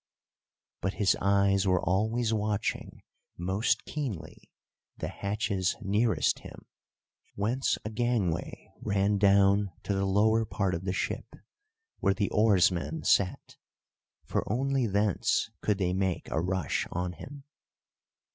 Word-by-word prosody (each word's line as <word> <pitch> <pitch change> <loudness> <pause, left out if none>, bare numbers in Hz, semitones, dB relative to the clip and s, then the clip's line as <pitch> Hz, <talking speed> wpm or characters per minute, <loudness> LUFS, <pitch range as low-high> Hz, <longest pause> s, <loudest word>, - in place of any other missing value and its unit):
But 95 - -2
his 100 -2 +3
eyes 100 0 +3
were 90 -1 +3
always 110 +6 0
watching 105 -1 -2 0.3
most 95 +6 0
keenly 110 - -6 0.5
the - - -4
hatches 100 -2 -1
nearest 105 +4 +1
him, - - -12 0.7
whence 120 +6 0
a 105 - -3
gangway 110 -7 -2
ran 100 0 +1
down 100 0 +4
to 100 - -1
the 95 0 0
lower 110 +3 +3
part 100 -3 -1
of 85 +2 -4
the 95 - 0
ship, - - -3 0.6
where 100 -3 +2
the 100 -2 -1
oarsmen 100 - +2
sat; 95 -2 +1 0.7
for - - -1
only 135 +1 +1
thence 100 -1 +1
could 105 -2 +1
they 90 -2 0
make 95 -1 -1
a 80 - 0
rush 90 -3 -1
on 90 0 -2
him. 140 - -10
100 Hz, 125 wpm, -29 LUFS, 95-110 Hz, 0.7 s, down